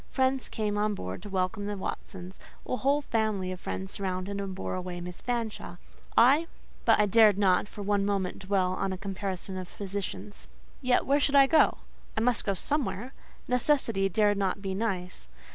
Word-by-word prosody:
Friends 260 Hz, 0 st, +1 dB
came 210 Hz, -1 st, -1 dB
on 210 Hz, 0 st, +1 dB
board 95 Hz, -, -5 dB
to 205 Hz, -, -8 dB
welcome 190 Hz, +1 st, -1 dB
the 205 Hz, -1 st, -3 dB
Watsons; 185 Hz, -1 st, -6 dB, 0.3 s
a -, -, -1 dB
whole 285 Hz, +3 st, +2 dB
family 215 Hz, -6 st, 0 dB
of 185 Hz, -, -6 dB
friends 190 Hz, +1 st, -5 dB
surrounded 195 Hz, 0 st, -3 dB
and 195 Hz, -1 st, -4 dB
bore -, -, -4 dB
away 180 Hz, -1 st, -4 dB
Miss 180 Hz, 0 st, -7 dB
Fanshawe; 230 Hz, -7 st, -3 dB, 0.4 s
I—but 285 Hz, +3 st, +3 dB
I 210 Hz, -, +5 dB
dared 210 Hz, -1 st, +6 dB
not 195 Hz, -1 st, +3 dB
for 205 Hz, 0 st, -8 dB
one 200 Hz, 0 st, +1 dB
moment 195 Hz, -2 st, -1 dB
dwell 190 Hz, -1 st, +1 dB
on 195 Hz, +1 st, -1 dB
a 185 Hz, -, -3 dB
comparison 195 Hz, -1 st, -4 dB
of 180 Hz, -1 st, -9 dB
positions. 200 Hz, 0 st, -5 dB, 0.3 s
Yet 250 Hz, -2 st, +2 dB
where 280 Hz, +2 st, +3 dB
should 285 Hz, 0 st, +1 dB
I 275 Hz, -1 st, +9 dB
go? 310 Hz, +3 st, +4 dB, 0.4 s
I -, -, +2 dB
must 245 Hz, 0 st, +1 dB
go 200 Hz, -, +1 dB
somewhere. 265 Hz, 0 st, -2 dB, 0.3 s
Necessity 250 Hz, -6 st, +2 dB
dare 210 Hz, +1 st, +3 dB
not 200 Hz, -1 st, -1 dB
be 195 Hz, -1 st, -3 dB
nice. 190 Hz, -3 st, -3 dB
200 Hz, 180 wpm, -29 LUFS, 190-230 Hz, 0.4 s, I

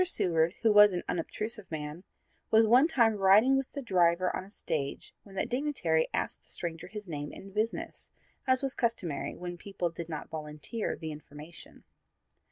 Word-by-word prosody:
Seward, 170 Hz, -, +2 dB
who 220 Hz, -2 st, +5 dB
was 210 Hz, -1 st, +8 dB
an 175 Hz, -, -2 dB
unobtrusive 210 Hz, +5 st, -3 dB
man, 155 Hz, +2 st, -5 dB, 0.5 s
was 225 Hz, 0 st, +6 dB
one 250 Hz, +7 st, +6 dB
time 230 Hz, -9 st, +3 dB
riding 205 Hz, +7 st, +6 dB
with 270 Hz, -1 st, -1 dB
the 280 Hz, -, -5 dB
driver 180 Hz, -3 st, +2 dB
on -, -, -3 dB
a 190 Hz, -, -14 dB
stage 150 Hz, -8 st, -4 dB
when 195 Hz, -2 st, -15 dB
that -, -, -1 dB
dignitary 245 Hz, -, +1 dB
asked -, -, -2 dB
the -, -, -25 dB
stranger 165 Hz, -1 st, -5 dB
his 210 Hz, -2 st, -8 dB
name 145 Hz, -3 st, -5 dB
and 195 Hz, 0 st, -11 dB
business, 215 Hz, +2 st, -3 dB, 0.4 s
as 260 Hz, +1 st, +3 dB
was 270 Hz, -1 st, -1 dB
customary 225 Hz, -, -2 dB
when 175 Hz, 0 st, -6 dB
people 180 Hz, -3 st, -3 dB
did 170 Hz, 0 st, -7 dB
not 155 Hz, -2 st, -5 dB
volunteer 150 Hz, -, -4 dB
the 160 Hz, -2 st, -6 dB
information. 150 Hz, +2 st, -12 dB
185 Hz, 175 wpm, -30 LUFS, 160-225 Hz, 0.5 s, was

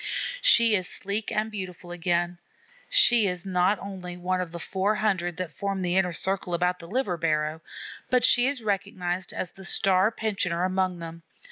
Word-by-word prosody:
She 235 Hz, -, +6 dB
is 185 Hz, -2 st, 0 dB
sleek 200 Hz, +2 st, -2 dB
and 220 Hz, +1 st, -1 dB
beautiful 180 Hz, -4 st, -7 dB
again. 175 Hz, 0 st, -1 dB, 0.5 s
She 240 Hz, -, +5 dB
is 180 Hz, -1 st, -3 dB
not 185 Hz, +2 st, +2 dB
only 185 Hz, -3 st, -7 dB
one 185 Hz, +1 st, -1 dB
of 175 Hz, -2 st, -5 dB
the 170 Hz, -, -6 dB
four 190 Hz, +5 st, -1 dB
hundred 185 Hz, -6 st, 0 dB
that 185 Hz, -3 st, -4 dB
form 195 Hz, -1 st, -3 dB
the 175 Hz, 0 st, 0 dB
inner 190 Hz, -2 st, +2 dB
circle 185 Hz, +1 st, -1 dB
about 180 Hz, +1 st, 0 dB
the 170 Hz, -, -10 dB
liver 200 Hz, -3 st, -1 dB
barrow, 155 Hz, -1 st, -1 dB, 0.5 s
but 250 Hz, -1 st, +3 dB
she 245 Hz, 0 st, +5 dB
is 270 Hz, -4 st, -2 dB
recognized 185 Hz, -3 st, -2 dB
as 180 Hz, -, -4 dB
the 195 Hz, -, -13 dB
star 190 Hz, +2 st, +3 dB
pensioner 195 Hz, -6 st, -1 dB
among 185 Hz, -1 st, 0 dB
them. 165 Hz, 0 st, -8 dB
185 Hz, 175 wpm, -26 LUFS, 175-200 Hz, 0.5 s, She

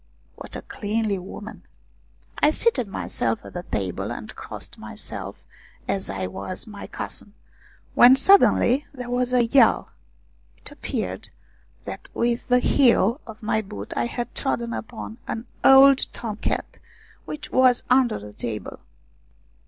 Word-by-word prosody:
What -, -, -8 dB
a -, -, -6 dB
cleanly 210 Hz, -1 st, -2 dB
woman! 205 Hz, +4 st, -9 dB, 0.8 s
I 300 Hz, -, +5 dB
seated 310 Hz, -, +1 dB
myself 115 Hz, -11 st, -3 dB
at -, -, -10 dB
the 175 Hz, -, -4 dB
table, 95 Hz, -, -3 dB
and -, -, -7 dB
crossed -, -, -7 dB
myself -, -, -7 dB, 0.4 s
as 195 Hz, -, -2 dB
was 95 Hz, -, -4 dB
my 205 Hz, -3 st, -9 dB
custom, 205 Hz, -, -6 dB, 0.6 s
when 250 Hz, +2 st, +8 dB
suddenly 280 Hz, -4 st, +5 dB
there 250 Hz, -2 st, -6 dB
was 250 Hz, 0 st, 0 dB
a 245 Hz, -1 st, +4 dB
yell. 265 Hz, +4 st, +4 dB, 0.7 s
It -, -, -8 dB
appeared -, -, -4 dB, 0.6 s
that -, -, -7 dB
with 235 Hz, 0 st, 0 dB
the 250 Hz, -1 st, +5 dB
heel 245 Hz, -1 st, +3 dB
of 220 Hz, -1 st, -11 dB
my 220 Hz, 0 st, +1 dB
boot 105 Hz, -, -8 dB
I 120 Hz, -, 0 dB
had 240 Hz, -, -5 dB
trodden 235 Hz, -4 st, -1 dB
upon 225 Hz, +1 st, -7 dB
an 225 Hz, +2 st, -4 dB, 0.2 s
old 270 Hz, 0 st, +7 dB
Tom 220 Hz, -3 st, -5 dB
cat -, -, -3 dB, 0.5 s
which 300 Hz, -1 st, -7 dB
was 255 Hz, -1 st, +4 dB
under 255 Hz, -2 st, +3 dB
the 105 Hz, 0 st, -10 dB
table. 105 Hz, -2 st, -6 dB
230 Hz, 135 wpm, -24 LUFS, 195-250 Hz, 0.8 s, when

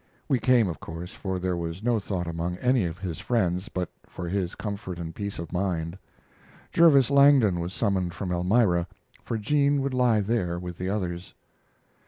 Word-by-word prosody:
We 135 Hz, -4 st, +2 dB
came, 120 Hz, -2 st, +4 dB
of 80 Hz, -6 st, -5 dB
course, 85 Hz, +3 st, -7 dB
for 95 Hz, -2 st, -3 dB
there 90 Hz, 0 st, -1 dB
was 85 Hz, +3 st, -5 dB
no 120 Hz, -1 st, +2 dB
thought 95 Hz, -3 st, -3 dB
among 85 Hz, +1 st, -3 dB
any 125 Hz, -1 st, +2 dB
of 85 Hz, 0 st, -4 dB
his 90 Hz, -4 st, -5 dB
friends 95 Hz, -3 st, 0 dB
but 90 Hz, -6 st, -3 dB, 0.2 s
for 90 Hz, -, -6 dB
his 95 Hz, 0 st, -2 dB
comfort 100 Hz, -4 st, -5 dB
and 85 Hz, -1 st, -6 dB
peace 100 Hz, +2 st, -5 dB
of 85 Hz, +1 st, -7 dB
mind. 90 Hz, -3 st, -1 dB, 0.8 s
Jervis 140 Hz, -6 st, +5 dB
Langdon 140 Hz, -10 st, +5 dB
was 85 Hz, +1 st, -3 dB
summoned 95 Hz, -4 st, -1 dB
from 95 Hz, -3 st, -4 dB
Elmira, 90 Hz, 0 st, +2 dB, 0.3 s
for 115 Hz, -, -3 dB
Jean 140 Hz, +5 st, +2 dB
would 140 Hz, -1 st, -2 dB
lie 125 Hz, -4 st, +3 dB
there 95 Hz, -5 st, -1 dB
with 90 Hz, -1 st, -7 dB
the 90 Hz, +1 st, -2 dB
others. 90 Hz, -3 st, -3 dB
95 Hz, 180 wpm, -26 LUFS, 85-115 Hz, 0.8 s, Jervis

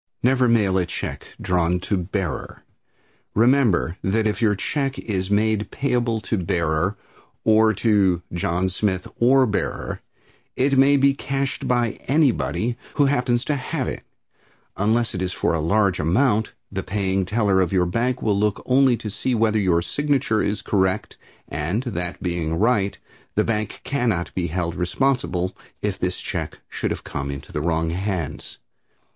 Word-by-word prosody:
Never 125 Hz, 0 st, +4 dB
mail 105 Hz, -5 st, +3 dB
a 90 Hz, -, +1 dB
check -, -, -6 dB
drawn 90 Hz, -1 st, +1 dB
to 100 Hz, -, -1 dB
"Bearer." 90 Hz, -1 st, -3 dB, 0.7 s
Remember 115 Hz, -, +3 dB
that 110 Hz, +3 st, +1 dB
if 105 Hz, +2 st, 0 dB
your 105 Hz, -3 st, +3 dB
check 135 Hz, +6 st, -2 dB
is 95 Hz, -3 st, -3 dB
made 105 Hz, +1 st, +1 dB
payable 120 Hz, -4 st, 0 dB
to 110 Hz, -2 st, -1 dB
"Bearer" 85 Hz, +2 st, 0 dB, 0.5 s
or 110 Hz, 0 st, +5 dB
to 95 Hz, -5 st, +2 dB
"John 85 Hz, +1 st, 0 dB
Smith 95 Hz, -1 st, -1 dB
or 130 Hz, +2 st, +5 dB
Bearer" 105 Hz, -4 st, -3 dB, 0.5 s
it 135 Hz, +2 st, +2 dB
may 135 Hz, +2 st, +5 dB
be 140 Hz, 0 st, +4 dB
cashed 135 Hz, 0 st, -3 dB
by 120 Hz, -2 st, +1 dB
anybody 125 Hz, -4 st, +1 dB, 0.2 s
who 145 Hz, -, +4 dB
happens 125 Hz, -3 st, +1 dB
to 150 Hz, -, 0 dB
have 135 Hz, 0 st, -3 dB
it. -, -, -4 dB, 0.7 s
Unless 110 Hz, +4 st, +1 dB
it 90 Hz, -, -3 dB
is 95 Hz, 0 st, -2 dB
for -, -, 0 dB
a 80 Hz, -, 0 dB
large 100 Hz, +2 st, +2 dB
amount 105 Hz, -, +2 dB, 0.2 s
the 95 Hz, -1 st, -2 dB
paying 95 Hz, -1 st, -1 dB
teller 100 Hz, -1 st, +2 dB
of 90 Hz, -, 0 dB
your 90 Hz, -2 st, +3 dB
bank 120 Hz, +8 st, -1 dB
will 105 Hz, -, +2 dB
look 105 Hz, -1 st, 0 dB
only 130 Hz, -1 st, +4 dB
to 110 Hz, -, -6 dB
see 120 Hz, +5 st, -1 dB
whether 110 Hz, -1 st, +2 dB
your 90 Hz, -4 st, +2 dB
signature 135 Hz, -4 st, 0 dB
is 105 Hz, -, -1 dB
correct, 95 Hz, -2 st, 0 dB, 0.3 s
and, 85 Hz, -, -2 dB
that 90 Hz, -7 st, -4 dB
being 85 Hz, -3 st, -1 dB
right, 100 Hz, 0 st, +1 dB, 0.4 s
the -, -, +3 dB
bank 110 Hz, -2 st, -2 dB
cannot 115 Hz, -11 st, -1 dB
be 90 Hz, -2 st, -1 dB
held 85 Hz, 0 st, -2 dB
responsible 90 Hz, -1 st, 0 dB, 0.3 s
if -, -, -1 dB
the -, -, +1 dB
check -, -, -5 dB
should -, -, -2 dB
have -, -, -4 dB
come 70 Hz, -1 st, -4 dB
into 70 Hz, -1 st, -7 dB
the 75 Hz, -, -2 dB
wrong 80 Hz, 0 st, 0 dB
hands. 95 Hz, -1 st, -3 dB
105 Hz, 160 wpm, -23 LUFS, 90-120 Hz, 0.7 s, or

